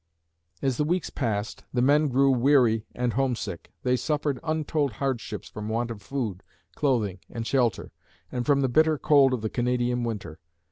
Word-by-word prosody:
As 130 -3 +1
the - - +2
weeks 175 +3 -1
passed, 110 -5 -2
the 125 - 0
men 150 +3 +4
grew 135 +1 +3
weary 125 -4 +3
and 125 -1 0
homesick. 120 -9 -2
They 125 0 +2
suffered 145 0 -1
untold 155 -4 0
hardships 125 -4 -3
from 105 +1 -6
want 115 +2 -1
of 105 -3 -8
food, 110 -5 -3 0.3
clothing 110 -10 0
and 115 -1 -5
shelter, 120 -4 0 0.4
and 125 -1 -2
from 140 +1 +3
the 135 - +2
bitter 155 +4 +3
cold 140 -2 +5
of 125 -3 -1
the 110 - -1
Canadian 125 0 0
winter. 100 -9 -5
125 Hz, 170 wpm, -26 LUFS, 115-140 Hz, 0.4 s, cold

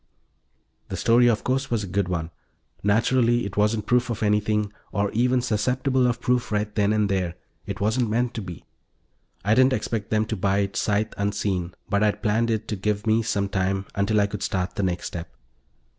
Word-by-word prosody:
The - - -4
story, 120 +1 +4
of 115 -2 +2
course, 135 +1 0
was 115 -3 0
a - - -5
good 95 +1 0
one. 85 -2 -3 0.5
Naturally 120 +3 +2
it 100 - -6
wasn't 105 +1 +1
proof 125 0 +2
of 115 -2 -2
anything, 105 0 +1 0.2
or 100 -1 0
even 125 +2 +2
susceptible 125 +3 +1
of 120 -1 -1
proof 125 -1 0
right 105 0 -1
then 105 -1 +2
and 105 -1 +2
there; 95 -3 -1 0.3
it - - -4
wasn't 110 +3 +1
meant 120 +2 0
to 115 - -4
be. 90 -4 -9 0.8
I 105 - +4
didn't 130 +2 +5
expect 110 -5 -2
them 110 0 +2
to 110 - -3
buy 100 0 +1
it 100 -1 -3
sight 105 +1 0
unseen, 100 -3 -1
but 100 0 +1
I'd 105 0 +1
planned 115 +2 +2
it 110 -1 -1
to 105 - -1
give 105 +2 -2
me 110 +1 +3
some 100 -3 -1
time 95 0 -1
until 100 +2 +1
I 100 - +4
could 100 0 -5
start 90 -2 -1
the 100 - -2
next 90 -2 -1
step. 85 -1 -5
105 Hz, 200 wpm, -24 LUFS, 100-115 Hz, 0.8 s, didn't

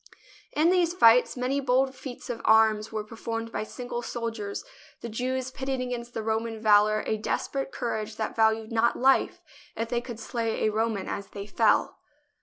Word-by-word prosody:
In 320 +4 +3
these 355 -2 +2
fights 245 -5 +5
many 255 +3 0
bold 265 0 +2
feats 255 -1 -7
of 230 - -6
arms 220 -1 +4
were 215 -1 -3
performed 230 +1 -5
by - - -2
single 240 +2 -5
soldiers, 225 -4 -4 0.4
the 235 - -5
Jews 255 +3 -2
pitting 265 0 -3
against 245 -1 -5
the 220 - -2
Roman 220 0 -2
valour 215 0 +4
a 220 - 0
desperate 270 +5 -2
cour 235 -2 -2
age 215 0 -5
that 220 -1 -3
valued 220 0 +2
not 230 +1 +2
life 265 +2 +2 0.3
if 230 0 -3
they 240 -1 0
could 240 -2 -8
slay 230 -1 -2
a 215 - +2
Roman 220 -2 -1
as 200 -1 -4
they 200 0 -7
fell. 210 +1 +2
230 Hz, 180 wpm, -27 LUFS, 220-250 Hz, 0.4 s, fights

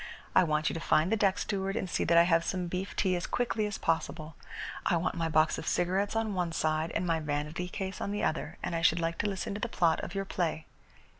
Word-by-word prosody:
I - - +6
want 155 -2 +1
you - - 0
to 165 - -3
find 165 +2 +2
the - - +4
deck 200 -3 +2
steward 195 -1 -2
and 190 - -1
see - - 0
that 170 - +4
I 170 - +9
have 165 -1 +3
some 180 0 -2
beef 180 +3 -4
tea 185 -2 +2
as 175 - -3
quickly 230 -3 0
as 205 - -4
possible. 160 -1 -2 0.5
I 175 - +2
want 165 - -1
my 165 -1 -1
box 155 0 +3
of - - -7
cigarettes 190 +4 +1
on 225 -2 0
one 175 -3 -1
side 155 0 0
and 180 - 0
my 165 -2 +1
vanity 150 +4 -3
case 190 0 -5
on - - -2
the 205 - -2
other, 160 - -1
and - - -2
I 165 - -1
should 165 +1 +4
like 165 0 -2
to 205 - +1
listen 195 0 -3
to 205 - -5
the 235 - -1
plot 170 -6 +2
of 175 - -6
your 195 0 -1
play." 165 -4 -2
175 Hz, 255 wpm, -30 LUFS, 165-195 Hz, 0.5 s, I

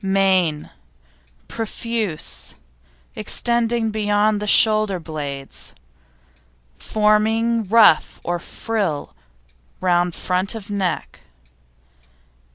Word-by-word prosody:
MANE 190 -5 +1 0.8
Profuse, 225 -5 -4 0.6
extending 235 -1 0
beyond 210 0 +1
shoulder 215 -4 +4
blades, 145 -4 -6 1.0
forming 220 - +1
ruff 215 -8 +5
or 175 0 -2
frill 190 - -3 0.7
round 175 -1 +1
front 185 +3 -1
of 210 -2 -8
neck. 195 -3 -3
205 Hz, 65 wpm, -21 LUFS, 175-220 Hz, 1.0 s, ruff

